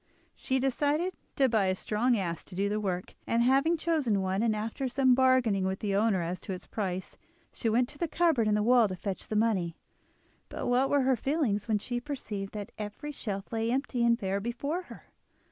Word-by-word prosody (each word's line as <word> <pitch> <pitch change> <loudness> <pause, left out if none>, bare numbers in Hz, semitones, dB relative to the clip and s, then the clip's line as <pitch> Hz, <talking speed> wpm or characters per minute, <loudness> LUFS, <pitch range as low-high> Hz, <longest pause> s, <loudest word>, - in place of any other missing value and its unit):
She 265 - -1
decided 290 +7 +1 0.2
to 270 - +4
buy 220 -5 +2
a 185 0 +1
strong 230 +5 +1
ass 170 -4 -3
to 185 - -11
do 200 +2 0
the 210 +1 0
work, 185 -3 -3
and 235 +1 +2
having 275 +7 +3
chosen 290 - +1
one, 190 +2 0
and 225 -2 +2
after 225 +5 -3
some 260 0 +3
bargaining 255 -6 +3
with 190 0 -1
the 200 -1 -2
owner 200 -3 +2
as 175 +2 -3
to 195 - -5
its 180 - -8
price, 190 -3 -4 0.3
she 230 - -1
went 240 +3 +3
to 290 - -14
the 340 - 0
cupboard 320 -9 +2
in 210 - +3
the 210 - +1
wall 240 -1 +5
to 185 - -4
fetch 190 +1 -5
the 215 - -3
money. 200 -7 +1 0.7
But - - -5
what 250 +2 +2
were 285 - +3
her 260 0 +3
feelings 245 -6 0
when 220 -2 +2
she 240 +3 -3
perceived 220 -8 -5
that 205 -2 -5
every 210 +8 -5
shelf 205 -6 -5
lay 225 0 0
empty 260 -2 0
and 235 0 +4
bare 195 -3 -1
before 280 - -3
her! - - -13
225 Hz, 215 wpm, -29 LUFS, 200-265 Hz, 0.7 s, wall